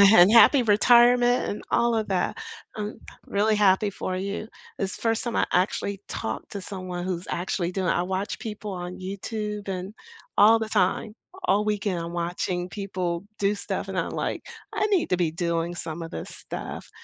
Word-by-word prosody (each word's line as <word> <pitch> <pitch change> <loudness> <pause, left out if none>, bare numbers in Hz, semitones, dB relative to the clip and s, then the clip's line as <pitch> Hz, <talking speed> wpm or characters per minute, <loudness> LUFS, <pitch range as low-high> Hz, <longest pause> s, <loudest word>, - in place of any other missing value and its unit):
and 180 +2 +8
happy 245 +3 +7
retirement 240 +3 +5
and 205 - -5
all 235 0 +3
of 220 -1 0
that, 185 -2 0 0.4
um, 210 0 -4 0.3
I'm - - -14
really 210 +2 +3
happy 205 0 +4
for 185 -1 -4
you. 200 +3 -3 0.3
It's 195 0 -2
the - - -14
first 225 -1 +1
time 235 -3 -3
I - - +3
actually 195 +2 0
talked 110 - -4
to 200 - -4
someone 185 -2 -5
who's 180 -1 -3
actually 175 0 -1
doing 190 -1 -1
it. - - +3
I 175 - +1
watch 190 +3 -3
people 210 -1 -6
on 180 -1 -6
YouTube 210 +2 -4
and 190 +1 -4 0.4
all 225 +2 +7
the 220 -1 -3
time, 210 +2 +1 0.3
all 210 +1 +2
weekend 205 -3 0
I'm 170 0 -5
watching 175 +1 -2
people 185 -2 -3
do 200 -1 +2
stuff 205 - -4
and - - -4
I'm - - -2
like, - - -3 0.3
"I - - +1
need 390 -5 +2
to 180 - +2
be 175 -2 +2
doing 170 0 -1
some 165 -1 -5
of 165 - -6
this 80 - -6
stuff." - - -7
195 Hz, 190 wpm, -26 LUFS, 180-215 Hz, 0.4 s, and